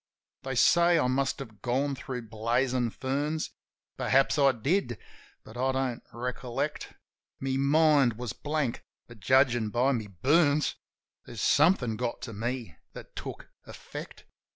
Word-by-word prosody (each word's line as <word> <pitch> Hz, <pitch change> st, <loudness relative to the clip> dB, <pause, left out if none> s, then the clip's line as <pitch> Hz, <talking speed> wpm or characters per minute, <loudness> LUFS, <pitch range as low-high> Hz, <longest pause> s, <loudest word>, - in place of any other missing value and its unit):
They 135 Hz, -1 st, -4 dB
say 170 Hz, +6 st, +5 dB
I 150 Hz, -, +2 dB
must 130 Hz, +2 st, 0 dB
have 110 Hz, -7 st, -10 dB
gone 135 Hz, +4 st, 0 dB
thro' 130 Hz, -2 st, -5 dB
blazin' 120 Hz, +3 st, 0 dB
ferns. 145 Hz, +6 st, -2 dB, 0.5 s
Perhaps 135 Hz, +2 st, +2 dB
I 140 Hz, -1 st, +6 dB
did; 140 Hz, -, -1 dB, 0.5 s
but -, -, -13 dB
I 130 Hz, +1 st, +1 dB
don't 130 Hz, -2 st, -2 dB
recollect. 125 Hz, 0 st, -4 dB, 0.4 s
My 135 Hz, 0 st, -1 dB
mind 140 Hz, -2 st, +4 dB
was 115 Hz, -1 st, -5 dB
blank, 145 Hz, -5 st, -2 dB, 0.2 s
but, 120 Hz, -2 st, -14 dB
judgin' 120 Hz, 0 st, +3 dB
by 125 Hz, +5 st, +2 dB
my 115 Hz, -5 st, -2 dB, 0.2 s
burns. 150 Hz, +1 st, +3 dB, 0.5 s
There's -, -, -8 dB
somethin' 140 Hz, -, +3 dB
got 120 Hz, 0 st, -3 dB
to 115 Hz, -, -6 dB
me 115 Hz, -5 st, -4 dB, 0.2 s
that -, -, -11 dB
took -, -, -7 dB, 0.2 s
effect. -, -, -9 dB
130 Hz, 135 wpm, -28 LUFS, 120-140 Hz, 0.5 s, I